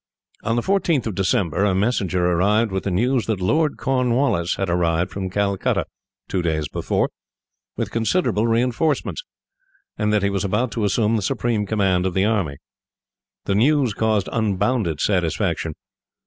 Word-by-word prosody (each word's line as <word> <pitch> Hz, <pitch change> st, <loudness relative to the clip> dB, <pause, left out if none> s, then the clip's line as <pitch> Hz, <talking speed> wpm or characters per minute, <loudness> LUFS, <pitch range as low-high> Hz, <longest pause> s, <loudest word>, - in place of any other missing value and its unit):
On 115 Hz, -, -1 dB
the 120 Hz, -, 0 dB
14th 180 Hz, -, +1 dB
of 110 Hz, -, -2 dB
December, 90 Hz, -1 st, 0 dB
a 100 Hz, -2 st, +2 dB
messenger 95 Hz, -4 st, +1 dB
arrived 100 Hz, +6 st, +2 dB
with 95 Hz, 0 st, -3 dB
the -, -, 0 dB
news 120 Hz, +6 st, +1 dB
that 110 Hz, -4 st, -1 dB
Lord 150 Hz, -, +1 dB
Cornwallis 125 Hz, -8 st, +1 dB
had 95 Hz, -, -2 dB
arrived 85 Hz, 0 st, +1 dB
from 95 Hz, -1 st, -4 dB
Calcutta, 100 Hz, 0 st, 0 dB, 0.4 s
two 95 Hz, -, -1 dB
days 80 Hz, -3 st, -1 dB
before, -, -, -1 dB, 0.7 s
with -, -, -2 dB
considerable 115 Hz, -, +1 dB
reinforcements, 125 Hz, -, 0 dB, 0.8 s
and 105 Hz, -1 st, +1 dB
that 105 Hz, -2 st, +2 dB
he 100 Hz, -, +1 dB
was 100 Hz, -2 st, -1 dB
about 105 Hz, +5 st, 0 dB
to 110 Hz, -3 st, -1 dB
assume 105 Hz, +3 st, +2 dB
the -, -, -1 dB
supreme 105 Hz, +2 st, -1 dB
command 95 Hz, -4 st, +1 dB
of 90 Hz, -, -4 dB
the 95 Hz, +1 st, +3 dB
army. 95 Hz, -11 st, 0 dB, 0.9 s
The 100 Hz, -, 0 dB
news 130 Hz, +2 st, +3 dB
caused 110 Hz, -2 st, 0 dB
unbounded 105 Hz, -, 0 dB
satisfaction. 85 Hz, -3 st, 0 dB
105 Hz, 155 wpm, -22 LUFS, 95-115 Hz, 0.9 s, the